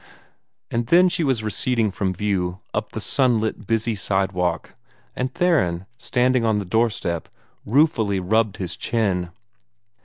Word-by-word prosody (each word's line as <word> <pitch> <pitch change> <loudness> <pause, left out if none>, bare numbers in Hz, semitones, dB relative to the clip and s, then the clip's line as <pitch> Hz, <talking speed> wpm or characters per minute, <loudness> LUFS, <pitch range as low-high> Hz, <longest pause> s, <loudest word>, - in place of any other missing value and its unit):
And 115 0 -1
then 180 +4 +6
she 170 - 0
was 130 -6 +1
receding 110 0 0
from 95 -1 -1
view, 95 -2 -2
up - - -3
the - - -3
sunlit, 120 -5 +1
busy 115 0 +1
sidewalk, 95 -4 -1 0.4
and 130 +1 -2
Theron, 120 - +1
standing 130 -2 +1
on 110 -2 +2
the 100 - -2
doorstep, 100 -5 0 0.4
ruefully 110 -6 +2
rubbed 110 +3 +1
his 90 -3 -4
chin. 95 -7 -1
110 Hz, 130 wpm, -22 LUFS, 95-125 Hz, 0.4 s, then